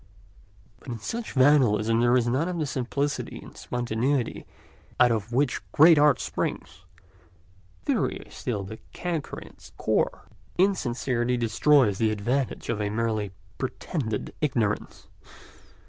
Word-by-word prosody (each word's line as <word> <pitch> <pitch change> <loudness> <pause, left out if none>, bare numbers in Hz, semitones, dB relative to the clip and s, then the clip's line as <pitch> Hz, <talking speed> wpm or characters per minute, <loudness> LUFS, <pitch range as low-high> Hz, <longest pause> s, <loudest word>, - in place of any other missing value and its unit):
But - - -19
in 120 -2 -4
such 225 - -5
vandalism 120 -6 +4
there 120 +1 +4
is 120 - +1
none 130 +8 +1
of 180 - -3
the 155 - 0
simplicity 140 +2 -2
and - - -12
spontaneity 120 +2 -2 0.5
out 125 -1 +6
of 110 0 -2
which 130 +2 +1
great 160 0 +7
art 145 -2 +5
springs: 80 +2 -4 1.0
theory - - +1
is - - -14
still 105 -5 -3
the 110 +3 -8
canker 170 -4 -3
in - - -12
its - - -17
core, - - 0 0.3
and 190 +2 +5
insincerity 125 -6 -1
destroys 120 -1 +3
the 110 - +3
advantages 120 +6 -2
of 110 -3 -1
a 105 - -1
merely 110 -1 -1 0.3
pretended 130 - -3
ignorance. 115 -8 -1
120 Hz, 135 wpm, -26 LUFS, 110-145 Hz, 1.0 s, great